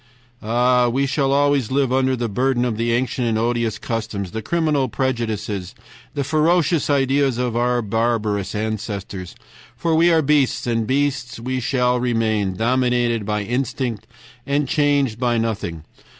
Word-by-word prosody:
"Ah! 120 +2 +2
we 135 +4 +1
shall 135 0 0
always 140 -3 +2
live 135 -1 +1
under 130 0 +2
the 120 -1 -2
burden 125 +3 +1
of 120 -3 -1
the 115 +2 0
ancient 125 0 0
and 110 -1 +1
odious 115 -1 0
customs, 105 -5 -4
the 110 - -4
criminal 150 -1 0
prejudices, 110 -4 -2 0.4
the 140 - 0
ferocious 160 +2 +2
ideas 135 -2 +2
of 125 -2 -1
our 120 0 +1
barbarous 105 -2 -1
ancestors, 105 -4 -4 0.4
for 165 +6 0
we 170 +2 +4
are 160 -1 +3
beasts, 145 -2 +2
and 115 -2 0
beasts 135 -3 -1
we 130 +2 -2
shall 125 0 +1
remain, 110 -5 0
dominated 120 -1 +1
by 105 -1 -1
instinct 125 0 -3 0.4
and 140 0 +1
changed 140 -5 +1
by 120 -2 +1
nothing. 105 -8 -3
120 Hz, 150 wpm, -21 LUFS, 110-135 Hz, 0.4 s, we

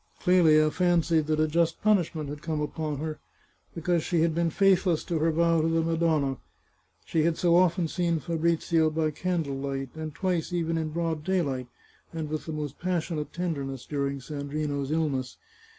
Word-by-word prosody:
Clelia 155 -4 +5
fancied 170 -2 +2
that 155 0 +1
a 155 - +3
just 165 +1 +1
punishment 175 -8 +2
had 145 +1 -7
come 160 -2 -2
upon 150 0 -3
her, 155 +1 -4 0.6
because 170 0 0
she 170 -3 +1
had 165 0 +2
been 170 +1 +1
faithless 185 -2 +3
to 165 -2 -2
her 165 +1 +2
vow 165 0 +3
to 160 - +1
the 165 0 +1
Madonna 160 -5 +1 0.3
— - - -40
she 160 - +1
had 160 +1 +1
so 170 -1 +3
often 175 -1 +3
seen 170 0 0
Fabrizio 165 0 +1
by 155 0 0
candlelight, 140 -6 -2
and 155 -2 -6
twice 180 -3 -1
even 165 -2 -1
in 160 -1 -1
broad 165 -1 -2
daylight, 145 -9 -1 0.4
and 160 -2 -4
with 155 +1 -4
the - - -3
most 150 -2 -5
passionate 170 -4 -2
tenderness, 140 -7 -4
during 140 -1 -2
Sandrino's 145 0 -3
illness! 145 -5 -1
160 Hz, 170 wpm, -27 LUFS, 150-170 Hz, 0.6 s, Clelia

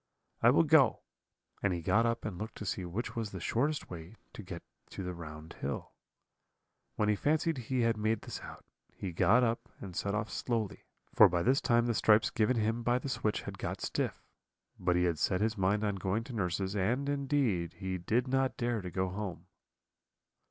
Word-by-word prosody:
I - - +7
will - - +5
go;' - - +4 0.6
and 100 -2 +2
he 85 -1 -4
got 110 +7 +3
up 115 0 -1
and 95 -5 -4
looked 110 +2 -5
to 105 - -6
see 95 -1 -2
which 100 +8 -4
was 115 -2 -2
the 95 - -7
shortest 140 - -1
way 85 +4 -8 0.2
to - - -8
get 90 -3 -8 0.3
to 95 - -6
the 90 0 -3
round 80 -1 -9
hill. 70 0 -3 1.0
When 105 - +1
he 105 - +3
fancied 155 - +1
he 125 +1 -1
had 115 -1 +2
made 110 0 0
this - - -6
out, - - -10 0.3
he 95 - -4
got 115 +8 +4
up 115 -1 -1
and 95 -3 -8
set 100 +2 -1
off 105 +1 -2
slowly, 115 -4 -2 0.3
for - - +8
by 85 -1 0
this 130 +3 +3
time 120 0 +3
the 120 - +1
stripes 105 0 +4
given 115 +1 +2
him 110 +2 0
by 120 +1 +2
the 130 +2 -4
switch 110 -4 -1
had - - -7
got - - -3
stiff; - - -2 0.6
but 90 -1 +2
he 90 - +3
had 85 -3 +1
set 95 - +1
his 110 +1 +1
mind 100 +2 +1
on 105 -2 0
going 95 +4 -1
to 125 - -9
nurse's, 95 -1 -1
and, 120 +8 0
indeed, 135 - 0
he 95 -2 -4
did 115 +9 +1
not 135 0 +1
dare 120 -2 0
to 90 - -5
go 95 +1 -1
home. 95 -3 -5
105 Hz, 205 wpm, -32 LUFS, 90-120 Hz, 1.0 s, for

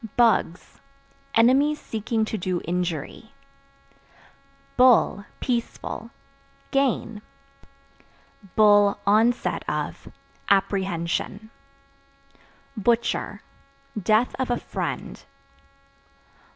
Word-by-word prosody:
Bugs 230 -7 +1 0.5
Enemies 275 +6 +4
seeking 220 0 -2
to 220 - -4
do 180 -3 -2
injury. 175 - -4 1.4
Bull 250 -5 +4
(Peaceful) 240 -2 -3 0.6
gain; 245 -5 0 1.4
(onset 210 +2 +3
of) - - -4 0.4
apprehension. 195 +1 -1 1.2
Butcher 235 +2 0 0.5
Death 215 +3 +1
of 260 - -1
a 245 - +1
friend. - - -5
220 Hz, 60 wpm, -24 LUFS, 195-240 Hz, 1.4 s, Enemies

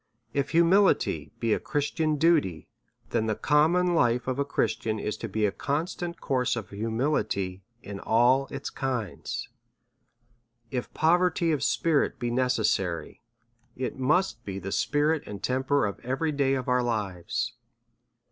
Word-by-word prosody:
If 140 -1 0
humility 170 - +3
be 115 -2 +1
a - - 0
Christian 150 +1 -1
duty^ 145 - +2 0.5
then 110 - +1
the 110 - 0
com 150 +6 +3
mon 180 0 +2
life 125 -5 +2
of 130 +1 -1
a - - +3
Christian 115 -5 -1
is 105 0 -3
to 115 - -5
be 110 +2 0
a 100 - +1
constant 170 - -3
course 130 -4 0
of 110 -5 -6
humility 105 -4 -1 0.2
in 100 0 -7
all 125 +6 +3
its 140 0 -5
kinds. 125 -8 -3 1.2
If 125 -2 -3
poverty 175 +1 +3
of 150 - 0
spirit 155 -4 +1
be 120 -1 -2
ne 125 +1 +2
cessary, 95 -9 -1 0.6
it 125 -1 -3
must 130 -3 +1
be 95 -3 -5
the 95 0 -5
spirit 145 +8 +1
and 100 -1 -7
temper 130 +1 +1
of 100 - -4
every 135 +6 -1
day 140 -2 +1
of 130 -2 -3
our 125 0 +3
lives. 115 +1 -2
130 Hz, 150 wpm, -27 LUFS, 110-150 Hz, 1.2 s, humility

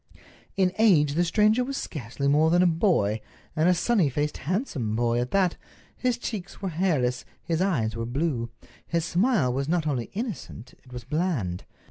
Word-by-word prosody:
In 185 -2 +2
age 160 -10 +5
the 170 +4 +2
stranger 215 +7 +3
was 275 +2 -4
scarcely 140 -1 -4
more 150 +3 +4
than 175 +2 +4
a - - +4
boy, 160 - +2 0.3
and 160 +2 +3
a 180 - +4
sunny 185 -4 +2
faced, 150 +3 -2
handsome 150 - -1
boy 120 0 +1
at 125 +1 -2
that. 190 -3 +1 0.4
His 250 -2 0
cheeks 200 -6 -6
were 195 - -3
hairless, 155 -8 0 0.2
his 165 0 -1
eyes 125 - 0
were 115 0 -3
blue. 125 -2 -1 0.4
His 170 -1 0
smile 175 - +2
was 135 +3 -2
not 170 -2 +1
only 130 -6 -2
innocent, 180 - -6
it 125 - -18
was 125 -1 -7
bland. 130 - -2
160 Hz, 175 wpm, -26 LUFS, 125-185 Hz, 0.4 s, age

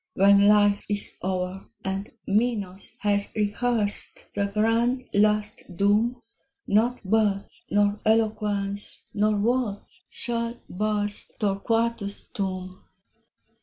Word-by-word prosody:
When 200 +1 +6
life 205 -1 +4
is 205 -1 +3
o'er, 185 0 -3 0.2
and 195 +2 -3 0.2
Minos 205 -3 -1
has 205 -1 +2
rehearsed 215 0 -1
The 200 0 0
grand 230 +5 +1
last 210 -3 +1
doom, 220 +5 +2 0.4
Not 230 +4 +1
birth, 200 -1 +1 0.2
nor 205 0 +2
eloquence, 210 -2 0
nor 210 +1 +2
worth, 225 -1 -1
shall 235 0 -2
burst 205 +1 0
Torquatus' 210 0 -1
tomb. 185 -1 -4
205 Hz, 95 wpm, -25 LUFS, 200-225 Hz, 0.4 s, When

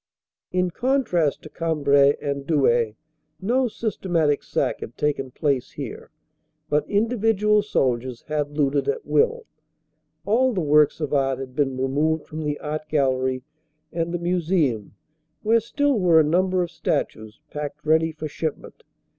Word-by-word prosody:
In 180 0 +1
contrast 210 - 0
to 155 - -10
Cambrai 145 -4 +3
and 140 0 -4
Douai, 120 -8 +2 0.5
no 250 +6 +1
systematic 175 -10 0
sack - - -1
had 115 - -9
taken 140 -3 -1
place 135 -1 -1
here, - - -7 0.6
but 150 0 0
individual 210 -1 +2
soldiers 130 - -1
had 150 -1 -3
looted 145 -1 +1
at 460 +1 -2
will. 470 +1 +1 0.8
All 245 +5 +3
the 195 - -1
works 150 0 +3
of 150 -2 -2
art 135 -2 +2
had 130 -1 -8
been 135 -3 0
removed 150 +4 0
from 155 +1 -6
the 150 -1 -2
art 155 0 -5
gallery 130 -3 +1 0.5
and 165 0 -1
the 175 - -1
museum, 170 - 0 0.5
where 225 +2 +4
still 280 +2 0
were 175 -4 +5
a - - +6
number 180 +4 +2
of 170 - -6
statues 110 -9 -3
packed 150 0 -6
ready 160 +1 +3
for 155 0 -6
shipment. 155 0 -5
155 Hz, 145 wpm, -23 LUFS, 140-185 Hz, 0.8 s, a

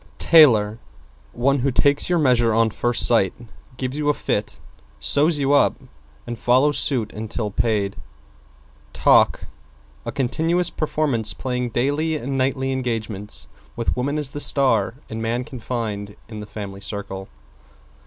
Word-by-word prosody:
=TAILOR= 115 -10 +5 0.5
One 135 +3 +1
who 135 +3 +1
takes 140 +4 +2
your 175 - +2
measure 120 -7 +3
on 115 -1 +3
first 120 +3 +2
sight, 105 -6 +3 0.4
gives 130 +3 -4
you 150 -1 0
a 145 - +2
fit, - - -3 0.4
sews 150 +2 +3
you 140 0 +1
up 145 - +4 0.5
and 120 -2 -6
follows 130 +4 +3
suit 125 -7 0
until 110 0 -4
paid. 100 -2 0 1.0
=TALK= - - +4 0.6
A - - -4
continuous 160 +6 0
performance 135 -8 -1
playing 125 -1 -3
daily 145 +7 0
and 135 -2 -4
nightly 135 0 0
engagements, 115 -5 -4 0.3
with 115 - -1
Woman 140 +4 -1
as 145 -3 -1
the 145 - -6
star 130 -7 +2
and 110 0 -6
Man 115 +2 -1
confined 110 -5 -5
in 110 -2 -8
the 105 - -8
Family 100 -2 -8
Circle. 95 -1 -5
125 Hz, 140 wpm, -22 LUFS, 110-140 Hz, 1.0 s, =TAILOR=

